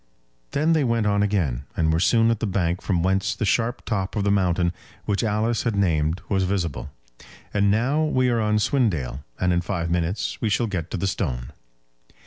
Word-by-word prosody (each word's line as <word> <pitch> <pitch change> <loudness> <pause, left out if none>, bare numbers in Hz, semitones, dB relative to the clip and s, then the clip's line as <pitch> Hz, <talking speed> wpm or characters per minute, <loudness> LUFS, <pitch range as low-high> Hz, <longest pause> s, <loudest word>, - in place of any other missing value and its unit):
Then 155 +3 +2
they 155 -3 +2
went 115 -3 +1
on 100 -1 +2
again, 85 - 0
and 80 -1 +2
were 80 - +2
soon 115 +5 +4
at 115 - -1
the 110 - -1
bank 90 -2 0
from 90 -4 0
whence 95 +1 +1
the 110 - -2
sharp 120 +4 0
top 95 -3 -2
of 105 - 0
the 100 - +2
mountain 90 -3 +1 0.3
which 100 +1 0
Alice 110 +1 0
had 115 -3 -1
named 85 -3 +1
was 95 -2 +1
visible. 90 -5 -2 0.6
"And 100 -1 +3
now 130 +9 +2
we 130 -4 +2
are 120 -1 +1
on 105 -1 +2
Swindale, 90 - 0 0.2
and 90 -1 +2
in 85 - +1
five 85 -1 -3
minutes 85 +3 -1
we 110 - +1
shall 115 +3 +1
get 90 -6 -3
to - - -3
the 90 - -2
stone." 65 -11 -2
100 Hz, 200 wpm, -24 LUFS, 85-115 Hz, 0.6 s, soon